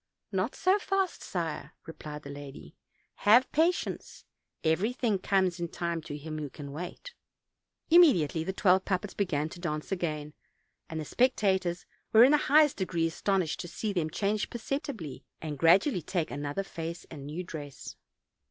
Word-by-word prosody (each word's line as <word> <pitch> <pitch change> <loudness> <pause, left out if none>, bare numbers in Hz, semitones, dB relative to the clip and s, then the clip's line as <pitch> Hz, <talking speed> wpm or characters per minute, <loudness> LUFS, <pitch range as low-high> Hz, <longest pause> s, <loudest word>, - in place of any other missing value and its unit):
"Not - - -1
so 385 +2 +3
fast, 390 -2 -1
sire," 165 -4 -4
replied 150 -2 -8
the 140 - -8
lady; 135 - -10 0.4
"have 235 +5 +5
patience; 330 +4 0 0.4
'everything 205 +6 +1
comes 185 -2 +1
in 170 - -2
time 170 0 -3
to 145 -1 -6
him 155 +1 -6
who 150 -2 -4
can 140 0 -9
wait.' 180 - -7 0.4
" - - -54
Immediately 180 - +6
the 190 - -1
twelve 190 -1 +3
puppets 190 +1 -2
began 155 -7 0
to 175 - -10
dance 155 -2 -4
again, 155 -5 -2 0.6
and 160 -1 -4
the 155 - -4
spectators 190 - +1 0.3
were 225 +1 +9
in 260 - +7
the 300 - +6
highest 300 0 +6
degree 170 -4 0
astonished 175 0 0
to - - -5
see 205 +4 -3
them 165 -4 0
change 205 +5 -1
perceptibly, 235 - -4 0.2
and 150 -3 -5
gradually 180 - +4
take 170 0 -2
another 145 +6 -3
face 170 -2 -6
and 145 -3 -8
new 160 +5 -4
dress. 145 -5 -8
175 Hz, 160 wpm, -29 LUFS, 155-210 Hz, 0.6 s, were